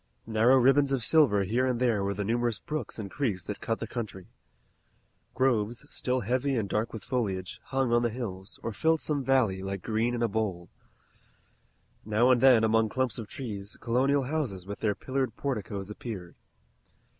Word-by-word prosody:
Narrow 115 +4 +4
ribbons 135 +2 +4
of 130 -5 0
silver 130 -11 +5
here 120 +7 +1
and 125 -2 0
there 115 -5 +2
were 100 0 -1
the 100 0 -2
numerous 120 0 0
brooks 150 -3 -5
and 100 -3 -6
creeks 110 -11 -1
that 105 - -6
cut 115 -1 -1
the - - -3
country. 105 -6 -6 1.1
Groves, 120 0 +1
still 125 0 -1
heavy 130 +5 0
and 105 -3 -1
dark 110 +3 -1
with 110 - -7
foliage, 95 -8 -3
hung 135 -3 0
on 120 - +4
the 120 - +1
hills, 105 -5 -6
or 115 - -3
filled 160 +8 +2
some 145 -3 -1
valley, 125 -8 +2
like 95 -1 -4
green 115 +2 0
in 120 - -1
a - - +3
bowl. 100 -5 -2 1.3
Now 110 +4 +3
and 125 -2 +4
then, 130 -4 +7
among 110 0 +3
clumps 130 0 -1
of 110 - -6
trees, 105 -5 -7
colonial 135 +4 +2
houses 130 - -2
with 100 +1 -6
their 105 -2 0
pillared 130 -3 -2
porticoes 105 -7 -4
appeared. 100 -6 -7
115 Hz, 180 wpm, -28 LUFS, 105-130 Hz, 1.3 s, then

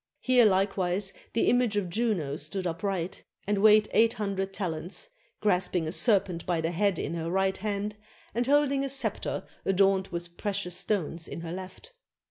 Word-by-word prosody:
Here 250 -2 +4
likewise 190 -1 +1 0.2
the 230 - +2
image 245 -4 +3
of 200 -3 0
Juno 180 -8 -1
stood 160 +6 -3
upright, 180 +1 -3 0.2
and 205 0 0
weighed 215 0 +6
eight 230 0 +4
hun 205 -2 -2
dred 195 0 -2
talents, 185 - -4 0.3
grasping 180 -4 +1
a - - -2
serpent 190 -4 +2
by 175 -2 +1
the 165 +1 -1
head 195 +2 +1
in 150 - -3
her 165 -1 -3
right 190 +1 +1
hand 210 +1 -3 0.4
and 240 +2 0
holding 280 -1 +3
a 275 - -2
scepter 265 -6 0 0.2
adorned 195 0 +3
with 175 -1 -6
precious 200 -4 -2
stones 180 -4 -1
in - - -6
her 165 -1 -6
left. 190 - -8
195 Hz, 170 wpm, -28 LUFS, 175-210 Hz, 0.4 s, weighed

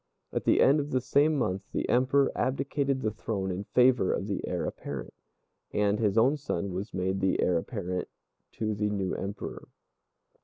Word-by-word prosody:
At - - -2
the - - +4
end 140 +3 +5
of 145 0 -3
the 130 - +1
same 145 +4 +3
month 95 -7 0
the - - -1
Emperor 130 +2 +3
abdicated 135 +1 0
the 110 - +1
throne 100 -3 -3
in 95 +3 -4
favor 125 -5 +4
of - - -1
the 100 -2 -2
Heir - - -2
apparent, - - -6 0.6
and 105 0 +1
his 105 -2 +1
own 130 +7 +4
son 100 -9 -3
was 95 +3 -4
made 95 +1 -1
the 95 0 +1
Heir 90 -2 +3
apparent 90 -3 -4 0.5
to 110 -1 -2
the 105 0 0
new 100 -3 -1
Emperor. 100 +1 -5
105 Hz, 180 wpm, -29 LUFS, 95-130 Hz, 0.6 s, end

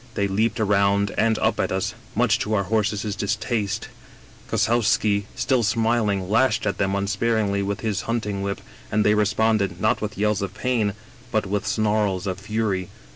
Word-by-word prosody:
They 100 - +1
leaped 110 +4 0
around 100 -1 +2
and 110 +1 +2
up 110 -1 0
at - - 0
us, 95 0 -1 0.2
much - - +3
to 110 +1 -1
our 100 - +1
horses' 105 0 -1
distaste 105 -1 -2 0.6
Kossowski, 105 -3 +2
still 130 -3 +1
smiling, 110 -3 +1
lashed 115 +2 +2
at 100 - -1
them 95 -1 +1
unsparingly 100 +1 0
with 100 0 -3
his 105 -4 -1
hunting 105 -4 -1
whip, 100 0 -3 0.3
and 105 0 +2
they 105 - +5
responded, 105 -3 +1
not 110 - +1
with 105 -1 -4
yells 105 0 +1
of 100 0 -4
pain, 115 -4 0 0.4
but 110 - +1
with 100 +1 -2
snarls 105 -3 +1
of 95 -1 -3
fury. 100 -3 -2
105 Hz, 165 wpm, -23 LUFS, 100-110 Hz, 0.6 s, they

